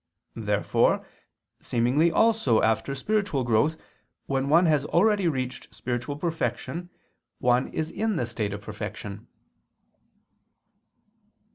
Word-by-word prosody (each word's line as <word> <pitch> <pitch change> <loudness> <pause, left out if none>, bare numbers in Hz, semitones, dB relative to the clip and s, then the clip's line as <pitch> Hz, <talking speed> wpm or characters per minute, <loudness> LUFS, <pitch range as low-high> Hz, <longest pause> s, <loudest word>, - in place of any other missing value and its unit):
Therefore - - +1 0.6
seemingly 130 +8 +2
also 220 - +3
after 110 +5 +1
spiritual 195 -3 0
growth, 120 +7 +2 0.5
when 135 0 -1
one 170 +4 +5
has 150 -4 +3
already 200 +4 +3
reached 130 -5 -3
spiritual 120 +3 -3
perfection, 165 +1 -3 0.5
one 125 0 +2
is 160 0 -3
in 220 -1 -1
the 125 - 0
state 115 -3 -3
of 100 0 -5
perfection. 105 -1 -7
135 Hz, 105 wpm, -26 LUFS, 120-170 Hz, 0.6 s, one